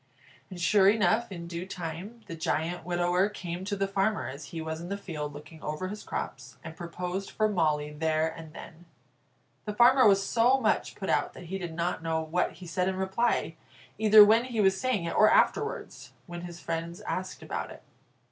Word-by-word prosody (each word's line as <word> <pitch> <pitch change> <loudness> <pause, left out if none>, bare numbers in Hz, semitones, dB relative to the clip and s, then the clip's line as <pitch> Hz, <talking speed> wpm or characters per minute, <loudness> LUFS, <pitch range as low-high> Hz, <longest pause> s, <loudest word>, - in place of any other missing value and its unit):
And 185 -2 -8
sure 195 +3 +5
enough, 210 +2 +2
in 170 -2 -6
due 170 +2 -6
time, 180 +6 -6
the 165 - -7
giant 165 +2 -2
widower 175 +3 +1
came 180 -3 -6
to 205 0 -2
the 195 0 0
farmer 195 +2 0
as 140 +3 -7
he 170 - -7
was 160 0 -4
in 175 - -7
the 200 - -2
field 150 -7 -5
looking 155 +2 -12
over 155 +5 -4
his 210 +1 -6
crops, - - -6
and 160 -2 -8
proposed 180 +3 -5
for 215 - +1
Molly 155 -6 0
there 155 +1 +1
and 160 -1 -8
then. 165 +2 -12 0.8
The 210 -1 -4
farmer 250 +2 +6
was 195 -1 +4
so 245 +5 +3
much - - 0
put - - -3
out - - +1
that - - -10
he 195 - -2
did 170 -3 -6
not 170 0 -1
know 160 0 -1
what 160 +3 -1
he 180 +2 -12
said 180 +2 -1
in 190 - 0
reply, 190 +6 0 0.4
either 215 -1 +9
when 225 +3 +4
he 240 -3 -4
was 190 -2 +3
saying 255 -8 0
it, 170 - -3
or 215 - +6
afterwards, - - 0
when 175 -2 -7
his 175 -1 -8
friends 165 +1 -4
asked 185 0 -4
about - - -4
it. - - -12
180 Hz, 200 wpm, -28 LUFS, 165-205 Hz, 0.8 s, either